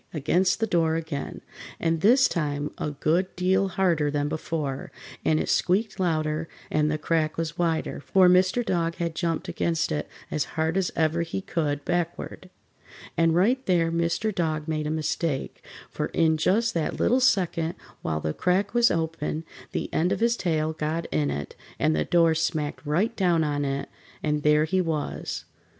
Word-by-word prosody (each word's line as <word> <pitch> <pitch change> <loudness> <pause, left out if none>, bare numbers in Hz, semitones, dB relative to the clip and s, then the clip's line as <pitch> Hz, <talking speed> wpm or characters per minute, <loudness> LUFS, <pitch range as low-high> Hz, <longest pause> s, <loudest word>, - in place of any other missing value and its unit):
against 180 +7 +2
the 225 - +2
door 165 -5 +2
again, 160 -3 -4 0.4
and 165 -1 0
this 250 +7 +6
time 145 -2 -2
a - - -1
good 160 +5 +1
deal 190 +2 +2
harder 175 -6 +1
than 145 0 0
before, 150 -3 -3 0.3
and 155 0 +2
it - - -2
squeaked 195 +2 +1
louder 155 -2 0 0.2
and 150 0 +2
the 155 - 0
crack 155 0 0
was 165 -1 -2
wider, 165 -2 0
for 185 +5 +4
Mr. 185 +6 +4
Dog 170 -4 0
had 170 -1 -2
jumped 165 -1 -2
against 165 -1 -1
it 150 - -2 0.2
as 155 - 0
hard 160 +1 +1
as 190 -3 +1
ever 160 +1 +1
he 170 +3 -3
could, 150 -6 -2
backward. 175 +1 -3 0.7
And 165 -1 +3
right 240 +9 +3
there 170 -3 +3
Mr. 170 +6 0
Dog 155 -3 -1
made 155 -1 -1
a - - -1
mistake, 155 -1 -2 0.3
for - - -2
in 160 -1 +2
just 215 +9 +2
that 165 -2 -2
little 250 - +3
second 175 - +2 0.3
while 80 -1 -2
the 75 0 -2
crack 190 +3 +1
was 240 0 +5
open 160 -1 -2 0.3
the - - -2
end 175 +3 +2
of - - 0
his 235 +1 +3
tail 160 -6 0
got 155 +2 -2
in 75 -2 +1
it, 70 0 -4 0.2
and 80 - +2
the 75 - 0
door 165 -2 +4
smacked 160 -2 -2
right 190 +10 +1
down 175 -4 +2
on 145 -1 -1
it, 140 0 -2 0.4
and 150 -1 0
there 150 0 +4
he 185 +4 +1
was. 160 -4 -3
165 Hz, 175 wpm, -26 LUFS, 155-180 Hz, 0.7 s, this